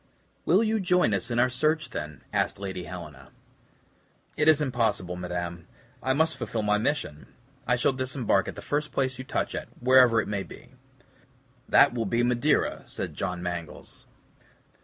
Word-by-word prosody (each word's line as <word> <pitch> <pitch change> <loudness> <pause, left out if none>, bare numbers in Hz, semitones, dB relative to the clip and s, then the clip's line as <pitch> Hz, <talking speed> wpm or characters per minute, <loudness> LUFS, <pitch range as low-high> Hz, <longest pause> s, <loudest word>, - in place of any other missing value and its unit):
"Will 190 +7 +4
you 220 0 +1
join 180 - +2
us 100 +4 -1
in 120 - -1
our 125 +1 +5
search, 155 +5 0
then?" 75 -1 -6
asked - - 0
Lady 95 -2 -5
Helena. 75 -6 -9 1.1
"It 150 - +1
is 155 -2 +6
impossible, 115 -10 0
madame. 85 -1 -5 0.3
I 130 - +1
must 160 +2 +1
fulfill 115 -2 -3
my 105 0 +2
mission. 110 - -2 0.4
I 125 - +3
shall 125 +2 +2
disembark 130 -2 0
at - - -5
the - - -9
first 150 +1 -2
place 130 -1 -1
you - - -4
touch - - -2
at, - - -4
wherever 125 -2 +6
it - - -1
may 100 -1 -2
be." 125 +5 -12 1.0
"That 140 - +6
will 115 -2 -2
be 120 +1 +1
Madeira," 125 +5 +1
said - - -5
John 90 -1 -3
Mangles. 85 -2 -6
120 Hz, 165 wpm, -27 LUFS, 90-140 Hz, 1.1 s, is